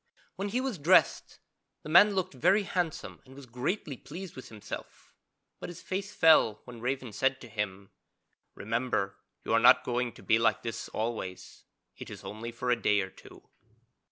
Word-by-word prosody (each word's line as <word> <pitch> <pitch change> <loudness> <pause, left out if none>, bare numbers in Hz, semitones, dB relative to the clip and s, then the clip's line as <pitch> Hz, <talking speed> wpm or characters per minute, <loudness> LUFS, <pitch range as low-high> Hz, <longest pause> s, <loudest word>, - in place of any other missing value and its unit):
When 200 +1 -3
he 245 +5 0
was 260 -9 -3
dressed 170 +6 +3 0.5
the - - -8
man 200 +5 +7
looked 185 -3 -1
very 195 - +3
handsome 180 -5 -3
and 130 0 -16
was 140 -1 -11
greatly 130 - -3
pleased 175 +7 -9
with 130 - -10
himself. 110 -2 -9 0.5
But - - -6
his 175 - -10
face 195 +2 -4
fell 155 -10 +5
when 120 -2 -11
Raven 125 -2 -3
said 135 +5 +1
to 120 - -10
him: 100 -3 -5 0.6
'Remember 110 -3 -2 0.3
you - - -1
are - - +5
not - - +7
going 120 -1 -1
to - - -15
be 110 - +3
like 115 - +2
this 115 -1 -5
always; 110 -5 -5 0.3
it - - -9
is - - -10
only 115 +3 -6
for 125 +1 -2
a 120 -2 +1
day 105 -1 +3
or 95 0 -5
two.' - - -16
125 Hz, 180 wpm, -29 LUFS, 115-175 Hz, 0.6 s, man